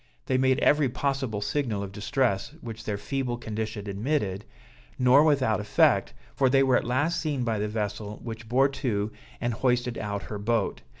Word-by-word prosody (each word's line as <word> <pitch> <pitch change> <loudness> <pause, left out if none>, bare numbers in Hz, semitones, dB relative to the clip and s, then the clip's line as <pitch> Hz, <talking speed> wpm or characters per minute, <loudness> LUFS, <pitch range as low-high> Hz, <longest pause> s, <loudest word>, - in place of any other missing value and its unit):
They 130 - +1
made 130 0 +3
every 145 -2 +4
possible 130 -4 -2
signal 110 -3 -1
of 100 - -6
distress 105 +4 -1
which 115 -2 -8
their 105 -2 -2
feeble 125 +3 -2
condition 110 -2 -4
admitted, 100 -2 -1 0.5
nor 130 +3 +6
without 135 -8 +3
effect, 105 0 +2 0.2
for 130 - +3
they 135 +1 +4
were 130 -2 +3
at - - +1
last 145 +8 +1
seen 145 -6 -1
by 115 -3 0
the 105 - 0
vessel, 105 -1 -4
which 115 -1 -7
bore 135 +3 +4
to 110 -6 -2 0.3
and 120 0 -1
hoisted 125 +1 0
out 100 -1 -3
her 105 - -6
boat. 110 - 0
120 Hz, 175 wpm, -27 LUFS, 105-130 Hz, 0.5 s, nor